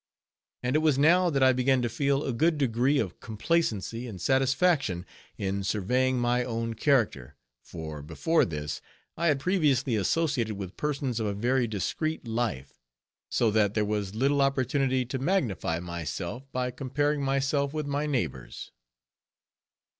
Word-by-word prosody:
And 125 +3 0
it - - +5
was 155 -4 +2
now, 175 +5 +5
that 135 -4 +1
I 130 0 +6
began 130 0 +2
to - - +1
feel 140 +4 0
a 135 - -2
good 160 +6 +2
degree 130 +1 +2
of 95 -9 -2
complacency 115 - -1
and 100 -6 -8
satisfaction 135 - +2 0.3
in 100 0 -2
surveying 125 +7 +1
my 120 +1 +1
own 115 -1 -3
character; 110 - +1 0.3
for, 80 -3 -7
before 85 - +1
this, 75 -3 -4 0.3
I 170 +1 0
had 145 -3 +3
previously 140 - +2
associated 120 -1 0
with 95 -2 -7
persons 140 -5 -2
of 110 - -1
a 100 - -2
very 120 +3 +1
discreet 125 - -3
life, 110 - -3 0.5
so 115 -2 +2
that 105 -1 +2
there 105 -1 +2
was 105 -1 -2
little 140 +4 +2
opportunity 130 -1 +1
to 130 +2 -4
magnify 125 - 0
myself, 85 - -5
by 125 0 -1
comparing 145 +3 -1
myself 140 +1 0
with 155 0 -3
my 145 +1 -1
neighbors. 120 - -3
125 Hz, 150 wpm, -28 LUFS, 105-140 Hz, 0.5 s, I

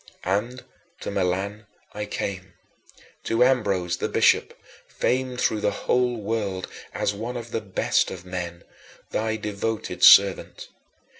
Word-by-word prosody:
And 110 +7 -1 0.4
to - - -4
Milan 100 +2 -2 0.3
I 105 0 -4
came, 95 -3 -5 0.7
to 115 +2 +3
Ambrose 100 -9 +1
the - - -2
bishop, - - +2 0.3
famed 125 0 -1
through 110 -3 +1
the - - +2 0.2
whole 125 -1 +2
world 100 -3 -3 0.2
as 100 - -1
one 115 +4 -5
of 120 -1 -8
the 115 - -2
best 100 -3 +1
of 90 -1 -8
men, 85 -2 -5 0.5
thy 110 0 -1
devoted 105 0 -3
servant. 100 -1 +6
105 Hz, 130 wpm, -24 LUFS, 95-115 Hz, 0.7 s, servant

